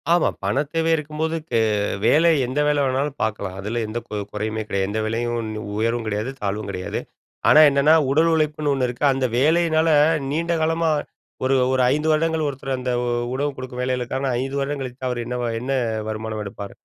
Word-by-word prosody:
ஆமா. 175 - +3
பணத் 140 +1 0
தேவை 165 0 +1
இருக்கும்போது, 155 +1 -3 0.2
கே - - +3 0.5
வேலை 165 +3 +5 0.2
எந்த 130 +4 -2
வேல 145 -1 +2
வேணாலும் 135 +2 -1
பாக்கலாம். 100 -3 -3
அதில 110 +4 -2
எந்த 110 +2 -4
கு 105 - -6 0.2
குறையுமே 110 +1 -2
கிடையாது. 95 -2 -1
எந்த 110 +2 -2
வேலையும் 120 +2 -1
ஒண்ணு 110 -1 -4 0.2
உயர்வும் 115 +1 0
கிடையாது, 105 +3 -2
தாழ்வும் 100 0 -3
கிடையாது. 90 -2 -4 0.5
ஆனா 150 - +8
என்னன்னா, 140 +2 +4 0.2
உடல் 160 +4 +4
உழைப்புன்னு 155 -2 0
ஒண்ணு 130 -2 0
இருக்கு. 120 +3 -6
அந்த 135 -1 0
வேலையினால, 160 +3 +3 0.4
நீண்ட 170 +3 0
காலமா 165 +1 +1 0.6
ஒரு 135 +1 +3 0.2
ஒரு 130 - +2
5 150 +2 -1
வருடங்கள், 160 0 +1
ஒருத்தர் 135 -1 -3
அந்த 125 0 -2 0.4
உணவு 145 +2 -1
குடுக்கும் 130 -1 -6
வேலைகளுக்கான, 130 +1 -1
5 135 +1 -3
வருடம் 140 0 -2
கழித்து 130 0 -5
அவர் 120 -1 -2
என்ன 125 +1 -3
வ - - 0 0.2
என்ன 130 +2 -3 0.4
வருமானம் 110 0 -4
எடுப்பார். 100 0 -8
130 Hz, 180 wpm, -22 LUFS, 115-150 Hz, 0.6 s, ஆனா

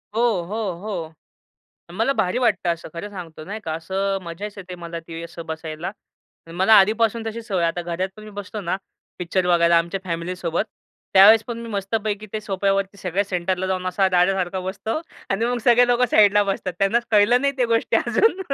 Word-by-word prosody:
हो, 230 - +2 0.2
हो, 210 +1 -3
हो. 170 -7 -5 0.8
मला 225 +9 +1
भारी 185 -3 0
वाटतं 240 -7 +1
असं 170 - -8
खरं 185 +5 -5
सांगतो 165 -5 -9
नाही 215 +4 -6
का 160 - -3
असं 195 +4 -2
मजाच 190 +5 -6
येते 185 -2 -8
मला 170 -1 -7
ती 165 0 -8
असं 170 0 -9
बसायला. 160 +1 -5 0.6
मला 190 +6 +4
आधीपासून 225 +3 +2
तशी 225 +1 -4
सवय 195 -6 -1
आहे. - - +3
आता 175 - -4
घरात 175 +2 -2
पण 215 - -11
मी 215 - -10
बसतो 205 +1 -5
ना, 185 0 -1 0.4
पिक्चर 180 +1 -1
बघायला 170 -1 +5
आमच्या 170 +3 -2
फॅमिलीसोबत, 170 0 -2 0.5
त्यावेळेस 210 +3 +8
पण 235 -1 -5
मी 235 0 -7
मस्तपैकी 210 +1 -2
ते 215 - -2
सोफ्यावरती 195 0 -1
सगळ्या 190 +2 -1
सेंटरला 185 0 -1
जाऊन 185 -1 -2
असा 190 +1 +2
दाद्यासारखा 185 0 +1
बसतो 200 +8 -3 0.3
आणि 205 +4 +1
मग 245 0 0
सगळे 245 0 +6
लोकं 245 0 +3
साईडला 205 -1 +5
बसतात. 195 -2 -2
त्यांना 195 +4 +3
कळलं 215 +4 +5
नाही 280 +1 +1
त्या 250 - +2
गोष्टी 230 0 +2
अजून 415 -4 +2
195 Hz, 185 wpm, -22 LUFS, 175-215 Hz, 0.8 s, त्यावेळेस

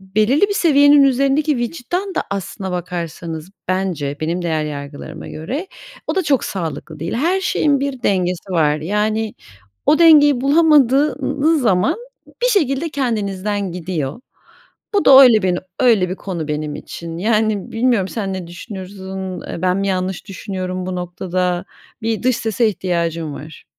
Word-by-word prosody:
belirli 215 - +1
bir 405 - -1
seviyenin 285 -5 +5
üzerindeki 275 +2 +2
vicdan 335 - -3
da - - 0
aslında 195 0 -4
bakarsanız 170 -1 -5 0.2
bence 180 -7 -1
benim 170 +3 -2
değer 160 -3 -1
yargılarıma 145 -1 -7
göre 265 - -5 0.4
o - - -1
da 380 - +1
çok 285 -5 +1
sağlıklı 160 -3 -5
değil. 165 +2 -3
Her 345 +10 +1
şeyin 290 -6 +1
bir 275 -3 -3
dengesi 185 -2 0
var. 150 -4 +2
Yani, 210 +5 -1 0.5
o 305 - +5
dengeyi 295 -6 +6
bulamadığınız 295 0 +3
zaman 220 - +2 0.5
bir - - +4
şekilde 325 - +1
kendinizden 205 - -2
gidiyor. 165 - -4 0.7
Bu 405 - +2
da 270 0 +9
öyle 230 -5 +6
bin 180 -1 +1 0.2
öyle 225 -8 +4
bir - - -1
konu 170 -6 -5
benim 150 0 -3
için. 165 -1 -7
Yani, 215 0 0
bilmiyorum 225 -5 +1
sen 200 -3 -3
ne 185 -2 -5
düşünürsün? 190 0 -7
Eee, 170 - -7
ben 185 0 +2
mi 195 0 -1
yanlış 185 +1 -2
düşünüyorum 185 -1 -5
bu 185 -1 -3
noktada? 180 0 -2 0.4
Bir 225 -1 -1
dış 255 -1 +2
sese 225 0 +1
ihtiyacım 170 -5 -2
var. 155 +1 -11
195 Hz, 145 wpm, -19 LUFS, 180-265 Hz, 0.7 s, da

